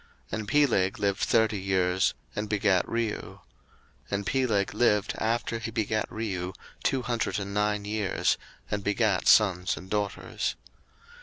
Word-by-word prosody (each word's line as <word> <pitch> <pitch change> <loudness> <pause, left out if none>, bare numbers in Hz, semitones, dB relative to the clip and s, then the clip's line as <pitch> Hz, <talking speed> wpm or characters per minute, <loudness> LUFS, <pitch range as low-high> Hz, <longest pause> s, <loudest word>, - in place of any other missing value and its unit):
01:011:018 - - -2
And 105 - -6
Peleg 115 -10 +3
lived 100 -1 +1
thirty 110 -3 +2
years, 95 -1 +1 0.2
and 105 0 -3
begat 100 -3 +2
Reu: 115 -2 -1
01:011:019 - - -12 0.7
And 100 0 -2
Peleg 110 -7 +1
lived 105 -2 +2
after 115 0 0
he 115 - -4
begat 110 -1 -1
Reu 95 -5 -3 0.3
two 130 -2 +1
hundred 120 -1 -1
and 100 -1 -4
nine 105 0 0
years, 105 -2 0 0.3
and 105 -1 -1
begat 105 -1 +1
sons 95 -4 +4
and 95 - -10
daughters. 105 -1 -2
105 Hz, 145 wpm, -28 LUFS, 100-110 Hz, 0.7 s, sons